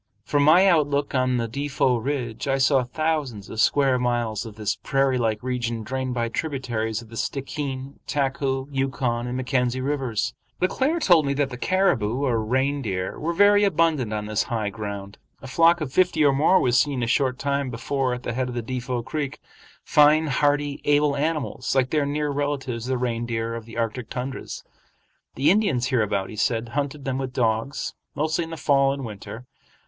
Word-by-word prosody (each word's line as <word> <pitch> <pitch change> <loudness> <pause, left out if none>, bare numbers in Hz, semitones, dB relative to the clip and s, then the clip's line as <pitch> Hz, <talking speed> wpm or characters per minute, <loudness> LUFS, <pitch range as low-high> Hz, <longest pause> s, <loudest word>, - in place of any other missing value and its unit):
From 145 - +1
my 160 +6 +6
outlook 145 -6 +2
on 130 -1 +2
the 115 -1 -1
Defot 130 -1 0
ridge 130 -4 -3
I 135 0 +2
saw 135 -1 +3
thousands 140 -6 -2
of 110 - -1
square 135 -1 +3
miles 120 -3 -1
of 110 - -10
this 110 -2 -1
prairie 135 -2 +1
like 110 -1 -1
region 120 -3 -2
drained 130 +1 -3
by 120 -1 0
tributaries 120 -5 -3
of 115 - -16
the 115 - -10
Stickeen, 135 +1 -4
Taku, 135 -1 -1
Yukon, 130 -3 -1
and 125 +1 -3
Mackenzie 130 -1 0
Rivers. 130 -5 -1 0.3
Le 185 - +3
Claire 285 - 0
told 170 - +4
me 140 - 0
that 140 -1 0
the - - -5
caribou, 130 - +1
or 115 -5 +1
reindeer, 125 -6 -1
were 165 - -1
very 205 +3 +5
abundant 160 - +2
on 105 -1 -3
this 105 0 0
high 110 -4 -1
ground. 100 -1 -6 0.2
A - - -12
flock 165 +6 +4
of 135 -4 -4
fifty 175 -4 +3
or 140 - +5
more 160 +7 +4
was 125 -1 +3
seen 140 -4 0
a - - +2
short 130 +1 +1
time 140 -1 -1
before 125 +2 -1
at 125 - -9
the 120 - -3
head 130 +1 -1
of 125 - -6
Defot 125 0 -3
Creek,—fine, 150 +1 +1
hardy, 145 0 +1
able 145 0 +3
animals 145 -3 -2
like 130 -1 +2
their 150 -2 +1
near 150 0 -1
relatives 135 -4 -2
the 130 0 0
reindeer 115 -2 -2
of 115 -1 -6
the 115 0 -10
Arctic 115 0 -2
tundras. 130 +1 -5 0.7
The 140 - +4
Indians 175 - +1
hereabouts, 105 -6 0
he - - -8
said, 115 +1 0
hunted 140 +1 -3
them 135 -1 -1
with 130 -1 -4
dogs, 115 +3 -1 0.2
mostly 155 +3 0
in - - -10
the 165 - -6
fall 140 -2 +3
and 140 -2 -5
winter. 110 +3 -8
130 Hz, 185 wpm, -24 LUFS, 120-145 Hz, 0.7 s, my